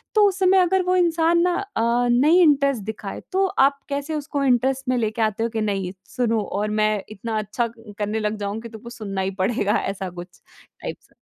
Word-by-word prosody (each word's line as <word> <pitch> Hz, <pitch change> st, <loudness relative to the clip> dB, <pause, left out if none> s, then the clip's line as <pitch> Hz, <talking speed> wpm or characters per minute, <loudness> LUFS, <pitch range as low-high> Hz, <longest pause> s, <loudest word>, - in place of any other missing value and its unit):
तो 420 Hz, -1 st, +6 dB
उस 395 Hz, 0 st, -2 dB
समय 380 Hz, 0 st, +4 dB
अगर 370 Hz, +1 st, +3 dB
वो 365 Hz, +1 st, +1 dB
इंसान 340 Hz, -1 st, +3 dB
ना 355 Hz, 0 st, +2 dB, 0.2 s
अ, -, -, +1 dB, 0.3 s
नहीं 300 Hz, +9 st, +5 dB
इंटरेस्ट 280 Hz, -, +3 dB
दिखाए 210 Hz, -1 st, -6 dB
तो 385 Hz, +1 st, +2 dB, 0.2 s
आप 280 Hz, 0 st, -4 dB
कैसे 285 Hz, +2 st, -3 dB
उसको 290 Hz, -1 st, -2 dB
इंटरेस्ट 265 Hz, +1 st, +1 dB
में 255 Hz, -, +2 dB
लेके 220 Hz, -1 st, -1 dB
आते 215 Hz, 0 st, 0 dB
हो 230 Hz, -, 0 dB
कि 225 Hz, -1 st, -3 dB
नहीं 195 Hz, -3 st, -1 dB, 0.2 s
सुनो 230 Hz, -3 st, +1 dB, 0.2 s
और 210 Hz, +1 st, -1 dB
मैं 215 Hz, 0 st, +3 dB, 0.2 s
इतना 215 Hz, +1 st, -4 dB
अच्छा 215 Hz, +3 st, -1 dB
क 225 Hz, -2 st, -13 dB
करने 210 Hz, +1 st, -1 dB
लग 210 Hz, 0 st, -1 dB
जाऊँ 205 Hz, +1 st, -3 dB
कि 235 Hz, -, -8 dB
तुमको 225 Hz, +1 st, -10 dB
सुनना 200 Hz, -5 st, -4 dB
ही 190 Hz, 0 st, -1 dB
पड़ेगा 205 Hz, +1 st, +1 dB
ऐसा 195 Hz, -1 st, -3 dB
कुछ 175 Hz, 0 st, -11 dB, 0.4 s
टाइप्स। -, -, -8 dB
235 Hz, 210 wpm, -23 LUFS, 210-295 Hz, 0.4 s, तो